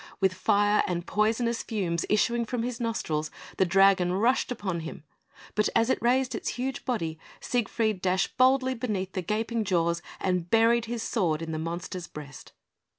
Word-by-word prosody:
With 190 -2 +2
fire 205 +2 +3
and 175 -1 -2
poisonous 225 +3 +1
fumes 175 -7 -2
issuing 235 +3 +2
from 235 0 -3
his 245 -1 -3
nostrils, 160 -10 -2 0.3
the 190 - +3
dragon 190 -1 +4
rushed 235 +7 +2
upon 195 -7 -3
him; 160 -2 -7 0.5
but 210 - +2
as 230 +3 +3
it - - 0
raised 255 +2 +2
its - - -3
huge 260 +2 -3
body, 165 -11 -2 0.2
Siegfried 220 -4 -1
dashed 185 0 0
boldly 260 +1 +4
beneath 210 -6 -3
the 185 - -3
gaping 220 +4 -1
jaws, 170 -3 +1 0.2
and 180 -2 -1
buried 230 +2 +4
his 230 -1 -4
sword 165 -9 0
in 160 - -5
the 155 - -3
monster's 170 +2 -5
breast. 145 -2 -10
205 Hz, 165 wpm, -27 LUFS, 175-235 Hz, 0.5 s, dragon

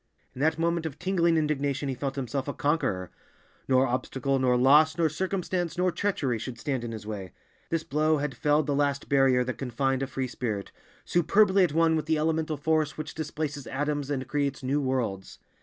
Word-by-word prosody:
In 130 - -7
that 160 +2 +2
moment 170 0 0
of 150 -2 -8
tingling 170 -2 +2
indignation 145 -2 0
he 135 - -1
felt 135 +1 -4
himself 135 0 -3
a 145 - -3
conqueror; 100 - 0 0.6
nor 130 0 +4
obstacle, 135 +2 -1
nor 125 -1 +3
loss, 150 +5 +5
nor 165 -2 +3
circumstance, 180 0 -2
nor 180 0 +2
treachery 145 - -1
should 120 +1 -6
stand 130 -1 -2
in 120 - -4
his 110 -2 -7
way. 100 -4 -6 0.4
This 165 -1 -1
blow 155 +2 +1
had 145 -1 -2
felled 150 0 +2
the 145 - 0
last 140 0 0
barrier 135 -2 +4
that 125 0 -5
confined 135 +1 -1
a 135 - -1
free 130 0 -3
spirit, 110 -5 -4 0.3
superbly 190 +3 +4
at 170 -5 +1
one 165 0 +3
with 155 -1 -2
the 160 -1 +2
elemental 155 0 0
force 155 0 0
which 155 0 -5
displaces 150 -2 -4
atoms 145 0 -2
and 130 -3 -2
creates 140 -1 -1
new 140 +3 +1
worlds. 120 -8 -2
145 Hz, 190 wpm, -27 LUFS, 130-160 Hz, 0.6 s, loss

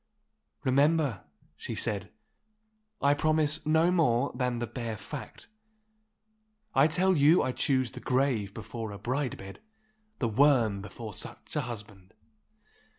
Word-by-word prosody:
'Remember,' 140 - +2 0.3
she - - -6
said, - - -3 0.9
'I 140 0 +5
promise 155 0 +1
no 160 +3 +4
more 140 -7 +2
than 125 -2 -1
the 120 - -2
bare 115 -1 -5
fact. 130 +7 -9 1.3
I 135 +3 +5
tell 185 +4 +2
you 155 +4 +5
I 130 - 0
choose 130 -1 0
the 125 - -9
grave 125 -6 0
before 110 +1 -6
a 100 - -7
bride 125 +5 -2
bed, 95 0 -10 0.6
the 120 - 0
worm 115 -4 +3
before 110 +2 -8
such - - -6
a 150 - +1
husband! 105 -6 -9
130 Hz, 130 wpm, -29 LUFS, 110-145 Hz, 1.3 s, I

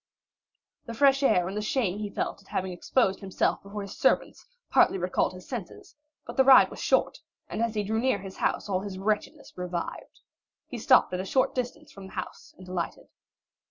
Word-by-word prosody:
The 230 - -6
fresh 275 +1 +4
air 180 -10 +3
and 195 - -5
the 210 - -1
shame 210 -3 -1
he 210 -1 -3
felt 200 - -3
at 195 - -23
having 185 0 -2
exposed 195 +2 +1
himself 195 -2 -1
before 200 +1 -7
his 200 - -8
servants, - - +1 0.2
partly - - +4
recalled 180 0 0
his 185 0 -12
senses, 235 -1 -8 0.3
but - - -9
the 265 - +6
ride 265 0 +7
was - - -9
short, - - +1 0.3
and - - -4
as 230 -1 0
he 210 - 0
drew 220 +2 -1
near 260 -2 +2
his 190 -1 -9
house - - -1
all 190 -2 0
his 195 -1 -6
wretchedness 210 +2 -2
revived. 180 -1 -5 0.4
He 245 - -7
stopped 255 -5 +4
at 180 - -1
a - - -2
short 260 +7 +1
distance 280 +5 -4
from 195 -5 -11
the - - -14
house 185 - -7
and 185 - -13
alighted. 180 -2 -4
200 Hz, 200 wpm, -27 LUFS, 185-240 Hz, 0.4 s, ride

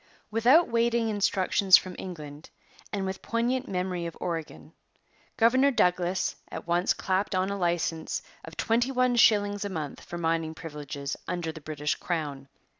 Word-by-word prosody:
Without 250 +10 +5
waiting 235 0 +1
instructions 195 -2 +4
from 185 -1 -6
England 155 -4 -8 0.4
and 200 -2 -2
with 190 0 -4
poignant 245 +3 -1
memory 180 -2 -2
of 170 - -9
Oregon, 150 - -5 0.6
Governor 260 +5 +5
Douglas 180 -5 +1
at - - -6
once 175 +2 +2
clapped 190 +1 -1
on 185 +1 +1
a - - -1
licence 170 -3 -1 0.2
of - - -11
twenty 235 +3 +1
one 255 -2 +2
shillings 205 -3 +4
a 200 - -3
month 155 -6 -5
for 175 - -7
mining 165 -1 -1
privileges 145 -3 -6
under 175 -2 -2
the 160 -1 -11
British 150 -1 -2
crown. 145 -6 -4
185 Hz, 150 wpm, -28 LUFS, 160-220 Hz, 0.6 s, Without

